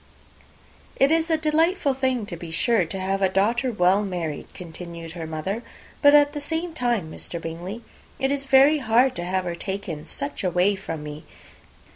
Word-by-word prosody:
"It 275 Hz, +2 st, +3 dB
is 325 Hz, 0 st, +2 dB
a 320 Hz, -, +3 dB
delightful 315 Hz, 0 st, +2 dB
thing, 260 Hz, -4 st, 0 dB
to 185 Hz, -, -6 dB
be 170 Hz, 0 st, -8 dB
sure, 190 Hz, +4 st, +2 dB
to 190 Hz, +4 st, -6 dB
have 195 Hz, +1 st, -1 dB
a 190 Hz, -, +3 dB
daughter 230 Hz, +7 st, +1 dB
well 195 Hz, -1 st, +3 dB
married," 170 Hz, -6 st, -4 dB
continued 170 Hz, -1 st, -8 dB
her 165 Hz, -1 st, -6 dB
mother; 175 Hz, +8 st, -3 dB, 0.4 s
"but 285 Hz, 0 st, +7 dB
at 290 Hz, 0 st, +5 dB
the 295 Hz, -, -4 dB
same 325 Hz, +3 st, -2 dB
time, 240 Hz, -, -1 dB
Mr. 170 Hz, -, -6 dB
Bingley, 175 Hz, +8 st, -6 dB, 0.3 s
it 270 Hz, 0 st, 0 dB
is 280 Hz, -1 st, -2 dB
very 275 Hz, +3 st, +6 dB
hard 245 Hz, +1 st, +3 dB
to 175 Hz, -, -3 dB
have 185 Hz, +1 st, -1 dB
her 175 Hz, -, -2 dB
taken 175 Hz, -4 st, -5 dB, 0.4 s
away 180 Hz, +2 st, +2 dB
from 165 Hz, -5 st, -6 dB
me. 150 Hz, +1 st, -8 dB
200 Hz, 175 wpm, -24 LUFS, 175-270 Hz, 0.4 s, but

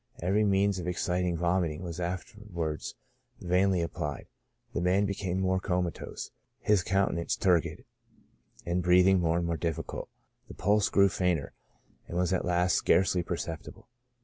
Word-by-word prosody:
Every 95 Hz, +5 st, +2 dB
means 100 Hz, -1 st, +2 dB
of 90 Hz, -, -5 dB
exciting 90 Hz, 0 st, 0 dB
vomiting 85 Hz, -1 st, 0 dB
was 85 Hz, -1 st, -6 dB
after 90 Hz, +5 st, -4 dB
wards 80 Hz, -3 st, -3 dB, 0.4 s
vainly 90 Hz, +1 st, +2 dB
applied 75 Hz, -3 st, -4 dB, 0.3 s
\ -, -, -41 dB
the -, -, -1 dB
man 95 Hz, +3 st, +3 dB
became 95 Hz, -2 st, -2 dB
more 95 Hz, 0 st, +1 dB
comatose, 90 Hz, -2 st, -3 dB, 0.3 s
his 105 Hz, -3 st, +3 dB
countenance 95 Hz, -2 st, 0 dB
turgid, 90 Hz, -4 st, +1 dB, 0.8 s
and 85 Hz, +1 st, 0 dB
breathing 90 Hz, +2 st, +5 dB
more 85 Hz, -1 st, +1 dB
and 85 Hz, -, -1 dB
more 85 Hz, -1 st, -1 dB
difficult; 80 Hz, -1 st, -4 dB, 0.4 s
the -, -, -10 dB
pulse 105 Hz, +1 st, +2 dB
grew 100 Hz, 0 st, +5 dB
fainter, 90 Hz, -6 st, -1 dB, 0.5 s
and 85 Hz, -, -4 dB
was 90 Hz, 0 st, +1 dB
at 95 Hz, -, 0 dB
last 90 Hz, +1 st, +2 dB
scarcely 95 Hz, -1 st, +3 dB
perceptible. 85 Hz, -2 st, -6 dB
90 Hz, 150 wpm, -29 LUFS, 85-95 Hz, 0.8 s, breathing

